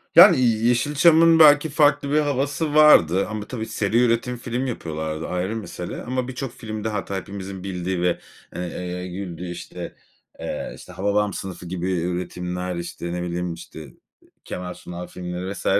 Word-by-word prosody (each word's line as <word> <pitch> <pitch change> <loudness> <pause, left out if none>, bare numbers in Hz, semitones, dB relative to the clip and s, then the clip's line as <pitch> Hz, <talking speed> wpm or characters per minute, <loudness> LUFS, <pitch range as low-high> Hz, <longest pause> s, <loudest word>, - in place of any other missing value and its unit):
Yani, - - +9
Yeşilçam'ın 145 +8 +4
belki 150 0 +7
farklı 145 -1 +3
bir 150 - +4
havası 145 +1 -1
vardı 100 - +6
ama 110 -1 -5
tabii 115 -4 -4
seri 110 0 0
üretim 120 +1 +1
film 120 +2 -3
yapıyorlardı, 80 -9 -4
ayrı 90 +4 -2
mesele 95 -5 -6
ama 125 0 -2
birçok 130 0 -5
filmde 110 -2 -5
hatta 100 -2 -3
hepimizin 95 -1 -6
bildiği 90 -1 -3
ve, 90 0 +1 0.4
eee, 90 +1 -4
güldüğü, 90 -1 -6
işte, 90 0 -8 0.4
eee, - - -4
işte, - - -12
"Hababam 100 +1 0
Sınıfı" 95 -2 -6
gibi 90 +1 -3
üretimler, 90 +1 -3
işte, 85 0 -5
ne 90 - -3
bileyim, 90 0 -3
işte, 80 -4 -11 0.5
Kemal 90 0 -5
Sunal 90 0 -8
filmleri 90 +1 -5
vs. - - -9
95 Hz, 150 wpm, -23 LUFS, 90-125 Hz, 0.5 s, Yani